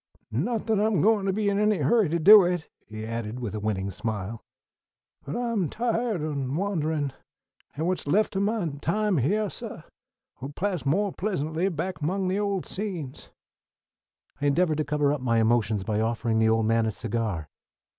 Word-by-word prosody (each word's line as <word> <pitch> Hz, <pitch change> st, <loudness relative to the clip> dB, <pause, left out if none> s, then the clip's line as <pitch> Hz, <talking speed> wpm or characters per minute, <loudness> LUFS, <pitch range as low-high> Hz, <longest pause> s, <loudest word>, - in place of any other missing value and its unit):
"Not 210 Hz, -, -1 dB
that 220 Hz, -2 st, +1 dB
I'm 215 Hz, -1 st, +2 dB
a -, -, +2 dB
gwine 210 Hz, -2 st, +3 dB
to 195 Hz, -, +2 dB
be 205 Hz, +2 st, -1 dB
in 200 Hz, 0 st, +1 dB
any 210 Hz, -1 st, +3 dB
hurry 180 Hz, -, +3 dB
to 170 Hz, -, +1 dB
do 200 Hz, +5 st, +9 dB
it," 175 Hz, -3 st, -1 dB, 0.2 s
he 110 Hz, 0 st, -7 dB
added, 115 Hz, +1 st, -4 dB
with 115 Hz, -5 st, -4 dB
a 110 Hz, -, -3 dB
winning 100 Hz, -2 st, -2 dB
smile, 110 Hz, +1 st, -4 dB, 0.8 s
"but 145 Hz, -, -5 dB
I'm 230 Hz, -9 st, -1 dB
tiahed 230 Hz, -4 st, -1 dB
o' 140 Hz, -2 st, -2 dB
wanderin', 160 Hz, -8 st, -1 dB, 0.6 s
an' 160 Hz, -, -1 dB
what's 180 Hz, -3 st, -1 dB
left 205 Hz, +7 st, +2 dB
o' -, -, +1 dB
my 205 Hz, -2 st, 0 dB
time 205 Hz, 0 st, +1 dB
hyah, 205 Hz, -, +1 dB
suh, -, -, -8 dB, 0.6 s
'll 135 Hz, -, -4 dB
pass 185 Hz, -6 st, -2 dB
mo' 195 Hz, +7 st, +2 dB
pleasantly 175 Hz, -2 st, -1 dB
back 170 Hz, -1 st, -4 dB
among 185 Hz, +5 st, 0 dB
the 190 Hz, +2 st, 0 dB
old 200 Hz, -3 st, -1 dB
scenes." 180 Hz, -10 st, -5 dB, 1.1 s
I 145 Hz, -, +2 dB
endeavored 155 Hz, +1 st, +2 dB
to -, -, +2 dB
cover 145 Hz, -1 st, +1 dB
up 145 Hz, -, -3 dB
my 115 Hz, -2 st, +1 dB
emotions 110 Hz, -3 st, +2 dB
by 110 Hz, +1 st, -1 dB
offering 115 Hz, 0 st, 0 dB
the 110 Hz, 0 st, +4 dB
old 110 Hz, 0 st, +2 dB
man 115 Hz, 0 st, +2 dB
a -, -, 0 dB
cigar. 110 Hz, -7 st, -3 dB
155 Hz, 185 wpm, -26 LUFS, -, 1.1 s, do